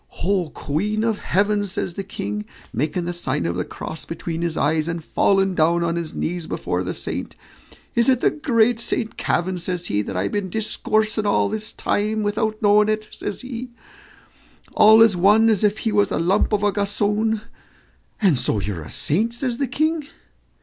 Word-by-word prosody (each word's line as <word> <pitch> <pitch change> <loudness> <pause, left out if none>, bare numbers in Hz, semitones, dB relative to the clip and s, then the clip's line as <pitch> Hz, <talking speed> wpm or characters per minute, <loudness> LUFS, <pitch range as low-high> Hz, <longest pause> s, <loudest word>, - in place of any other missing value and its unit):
"Oh, 185 -3 +1
queen 210 +12 -2
of 225 -2 0
heaven!" 205 +2 +1
says 185 -2 -4
the 195 - -4
King, 105 - -5 0.3
making 155 +6 -1
the 175 - -2
sign 130 - -2
of 85 +1 -1
the 90 - -1
cross 160 - -7
between 165 0 -5
his 170 -2 -2
eyes, 155 +1 +1
and 165 -1 -3
falling 195 -1 +2
down 170 0 +2
on 170 0 0
his 170 -2 -4
knees 175 0 -3
before - - -2
the - - -4
saint; - - -5 0.6
"is 235 +2 +3
it 255 -2 +4
the - - +3
great 245 -6 +2
Saint 225 -1 -2
Kavin," 180 +1 -1
says 180 0 -3
he, 105 -10 0
"that 95 -2 -5
I've 95 +2 -1
been 205 -2 -2
discoursing 215 +1 0
all 200 - +2
this 215 +1 -4
time 215 0 -1
without 215 +1 -1
knowing 210 +1 +5
it," 215 0 -1
says 205 - -5
he, 250 -1 -6 1.0
"all 220 +1 +8
as 220 -4 +4
one 210 +5 +5
as 215 -1 +1
if 210 0 +2
he 225 - -1
was 205 -1 +3
a - - -1
lump 185 +7 +2
of 210 -1 +1
a 205 - +3
gossoon? 210 +2 0 0.8
and 180 - +3
so 115 -4 0
you're 95 -3 -4
a 75 - -10
saint?" 220 +10 0
says 245 -1 -2
the 275 - 0
King. 310 +3 0
205 Hz, 190 wpm, -22 LUFS, 170-220 Hz, 1.0 s, all